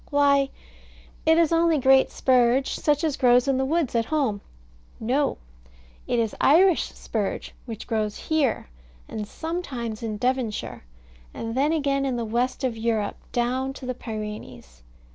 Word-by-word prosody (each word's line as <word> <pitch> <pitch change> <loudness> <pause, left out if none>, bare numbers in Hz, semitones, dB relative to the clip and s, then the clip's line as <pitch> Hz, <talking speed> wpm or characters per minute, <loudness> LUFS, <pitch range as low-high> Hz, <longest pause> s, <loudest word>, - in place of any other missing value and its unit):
Why, 280 -1 +3 0.8
it 320 0 +6
is 335 -2 +3
only 330 -1 +3
great 265 0 +5
spurge, 255 +1 +2
such 295 0 +1
as 310 -4 +1
grows 245 0 +4
in 270 -1 +2
the 265 - +1
woods 310 -1 0
at 230 -1 +1
home. 255 -9 0 0.6
No. 255 +6 0 0.7
It 245 - 0
is 225 -2 0
Irish 345 +4 +4
spurge 210 -4 -4
which 225 -3 -6
grows 215 -3 -1
here, 290 - 0 0.4
and 210 -1 -5
sometimes 260 -9 -5
in 220 -2 -3
Devonshire, 245 - -2 0.5
and 225 0 -4
then 280 +5 +2
again 280 -3 +1
in 265 -2 -1
the 235 -1 -2
west 245 +5 -1
of 250 -3 0
Europe, 220 -2 -1
down 255 +2 -1
to 270 - -9
the 255 - -2
Pyrenees. 210 - -8
255 Hz, 150 wpm, -25 LUFS, 225-285 Hz, 0.8 s, it